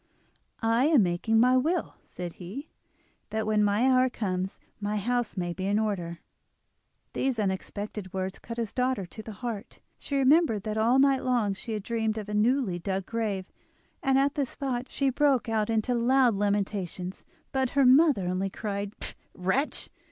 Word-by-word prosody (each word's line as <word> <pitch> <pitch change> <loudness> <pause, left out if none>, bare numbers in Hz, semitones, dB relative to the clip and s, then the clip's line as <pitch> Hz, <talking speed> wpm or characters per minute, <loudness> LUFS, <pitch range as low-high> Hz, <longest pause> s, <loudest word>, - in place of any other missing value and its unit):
"I 230 +3 +3
am 300 -9 +5
making 185 +6 +1
my 250 +2 +5
will," 320 +7 +1
said 175 -2 -7
he, 230 - -7 0.6
"that 220 +1 -2
when 215 -1 +2
my 205 +5 +3
hour 255 0 +4
comes 190 -5 -3 0.2
my 210 0 -1
house 240 +1 -1
may 175 -1 -1
be 185 +2 -3
in 205 +1 +2
order." 180 -6 -2 0.9
These 265 -2 0
unexpected 200 0 -3
words 190 0 -3
cut 230 0 -8
his 230 -3 -3
daughter 250 -5 0
to 195 +5 -10
the 220 - -8
heart; 225 -1 -5 0.2
she 280 - -2
remembered 275 - +4
that 215 -1 -3
all 230 +4 +3
night 270 -1 +4
long 240 -6 +1
she 220 +4 -6
had 210 -2 -3
dreamed 225 -1 -1
of 210 -1 -5
a - - -4
newly 215 -3 +2
dug 190 +1 -2
grave, 210 -5 -2 0.6
and 270 -1 +3
at 275 +1 +3
this 280 -4 -2
thought 260 -2 -3
she 275 -1 +1
broke 275 -2 +2
out 220 -1 0
into 225 +2 +1
loud 245 +1 +4
lamentations. 195 -3 -2 0.3
But 265 -2 +1
her 275 - +6
mother 265 - +5
only 185 +2 -1
cried: 200 0 -4 0.4
"Wretch! 190 +11 -1
220 Hz, 170 wpm, -28 LUFS, 195-255 Hz, 0.9 s, her